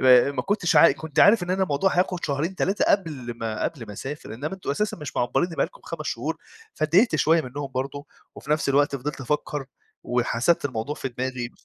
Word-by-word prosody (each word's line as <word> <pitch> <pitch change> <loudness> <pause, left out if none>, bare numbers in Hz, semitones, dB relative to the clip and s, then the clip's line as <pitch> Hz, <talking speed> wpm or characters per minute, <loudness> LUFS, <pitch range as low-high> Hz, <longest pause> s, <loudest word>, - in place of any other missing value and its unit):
ما 130 +1 +6
ما - - -2
كُنتش 200 -4 +1
عا 165 - +8
كُنت 155 +1 -2
عارف 205 -1 +6
إن 175 - -3
أنا 190 +1 +1
الموضوع 180 +3 +1
هياخد 180 -1 +1
شهرين، 150 +5 -1
3 195 +2 +1
قبل 150 -11 0
ما 110 -1 -3
قبل 140 -9 -4
ما 105 - -8
أسافر، 135 +2 -7
إنّما 145 +10 -4
أنتم 190 - -5
أساسا 210 +9 -1
مش 150 -5 -8
معبّرينّي 165 +8 0
بقى - - +2
لكم - - -18
5 - - -6
شهور، - - -2 0.4
فاتضايقت 170 +5 +3
شوية 160 +2 +4
منهم 135 +1 -6
برضه، 140 +3 -3 0.3
وفي 145 - -10
نفْس 150 -1 +1
الوقت 140 0 +3
فضلت 140 +2 -5
أفَكّر 145 +1 -2 0.4
وحسبت 125 +6 +1
الموضوع 130 +1 -2
في 140 - -4
دماغي 125 -1 -4
145 Hz, 200 wpm, -25 LUFS, 130-170 Hz, 0.4 s, عا